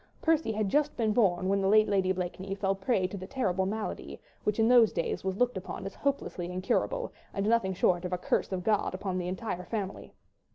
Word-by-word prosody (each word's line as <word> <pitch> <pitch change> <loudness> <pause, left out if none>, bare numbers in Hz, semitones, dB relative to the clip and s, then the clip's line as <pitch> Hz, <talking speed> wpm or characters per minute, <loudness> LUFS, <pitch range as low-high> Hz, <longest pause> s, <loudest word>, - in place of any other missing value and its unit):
Percy 320 -6 +2
had 215 -1 0
just 295 +7 +1
been 220 -2 +1
born 185 -5 +2
when 195 +1 +2
the 190 - +1
late 215 +2 +5
Lady 190 -2 +2
Blakeney 190 +1 -3
fell 195 -1 0
a - - 0
prey 195 -1 +1
to 185 +2 -4
the 185 0 -7
terrible 190 -8 0
malady 215 +2 -4 0.3
which 210 - +1
in 225 - +4
those 240 -3 +6
days 170 - -2
was 190 0 -2
looked 245 -1 +1
upon 190 0 -6
as 195 - -5
hopelessly 230 -10 -2
incurable 195 - -1 0.2
and 195 +1 0
nothing 215 -5 +2
short 175 0 +2
of 180 - -4
a 180 - 0
curse 180 - 0
of 185 -1 -2
God 210 -2 +1
upon 185 -1 -2
the 175 - -3
entire 185 -1 -4
family. 200 -1 -5
195 Hz, 220 wpm, -29 LUFS, 185-220 Hz, 0.3 s, those